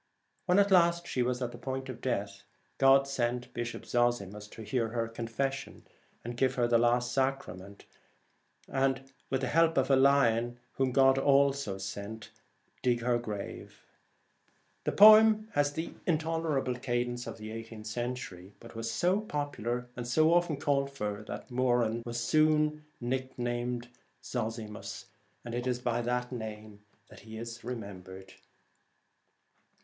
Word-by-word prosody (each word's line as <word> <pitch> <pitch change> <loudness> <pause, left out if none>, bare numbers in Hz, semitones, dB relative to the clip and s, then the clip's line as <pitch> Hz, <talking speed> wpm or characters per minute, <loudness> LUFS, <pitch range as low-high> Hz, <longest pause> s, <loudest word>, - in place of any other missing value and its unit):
When 180 +1 +4
at 200 0 +4
last 170 -1 +4
she 130 - -1
was 125 +1 0
at 120 - -3
the 120 - -10
point 130 +1 -4
of 130 -3 -7
death, - - -2 0.4
God 135 0 +6
sent 125 -2 -2
Bishop 120 0 -5
Zozimus 105 -4 0
to 110 - -10
hear 115 +1 0
her 115 0 -2
confession, 120 +4 -4 0.5
give 130 +2 +1
her 120 -2 +2
the 120 -1 +4
last 120 +1 +2
sacrament, 130 -8 -3 0.8
and 135 0 0 0.2
with 130 - 0
the - - -1
help 165 -1 +3
of 135 +1 +2
a - - +7
lion, 120 -3 +3 0.2
whom 135 - +1
He 130 - -3
sent 135 -1 +6
also, 110 -7 +1 0.6
dig 120 -1 +1
her 120 0 +1
grave. 105 -4 -7 1.0
The - - +1
poem 215 +1 +8
has 145 0 +1
the 160 +3 -3 0.2
intoler 160 -2 +1
able 125 -2 -3
cadence 120 -1 -2
of - - -6
the 110 0 -8
eighteenth 115 -1 -8
century, 110 -5 -5
but 115 - -13
was 115 0 -4
so 180 - +2
popular 125 - -3
and 120 -1 -5
so 155 +7 +4
often 175 -4 +2
called 140 -2 +1
for 105 -6 -4
that - - -7
Moran 120 -2 +1
was 120 0 -3
soon 150 +3 +2 0.2
nicknamed 120 -1 -3 0.4
Zozimus, 110 -3 -5 0.4
and 120 +1 -2
by 120 +1 0
that 125 +1 -1
name 110 -3 -7 0.3
is - - -13 0.4
he - - -11
remembered. 95 -5 -8
125 Hz, 140 wpm, -30 LUFS, 115-140 Hz, 1.0 s, poem